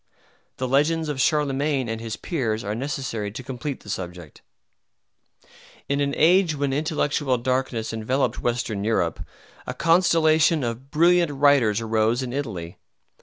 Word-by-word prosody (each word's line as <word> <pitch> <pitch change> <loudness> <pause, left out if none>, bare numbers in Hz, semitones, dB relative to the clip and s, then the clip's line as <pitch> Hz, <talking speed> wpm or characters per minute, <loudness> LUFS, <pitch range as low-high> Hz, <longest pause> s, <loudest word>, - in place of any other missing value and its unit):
The 130 - -2
legends 150 +4 +1
of 140 -3 -2
Charlemagne 140 -2 +1
and 115 0 -4
his 110 -2 -5
peers 115 -10 -2
are 105 0 -3
necessary 125 -4 -3
to 130 - -7
complete 135 +2 -5
the - - -12
subject. 90 -5 -7 1.5
In 140 +1 0
an 140 0 0
age 170 0 +4
when 140 -1 -1
intellectual 145 -2 0
darkness 120 -2 -2
enveloped 125 +5 -1
Western 120 -4 -2
Europe, 105 -7 0 0.4
a - - -4
constellation 165 -2 +3
of 120 +3 -4
brilliant 170 +1 +3
writers 135 -7 +3
arose 115 +2 +1
in 125 -1 -5
Italy. 95 -12 -5
135 Hz, 135 wpm, -24 LUFS, 115-150 Hz, 1.5 s, age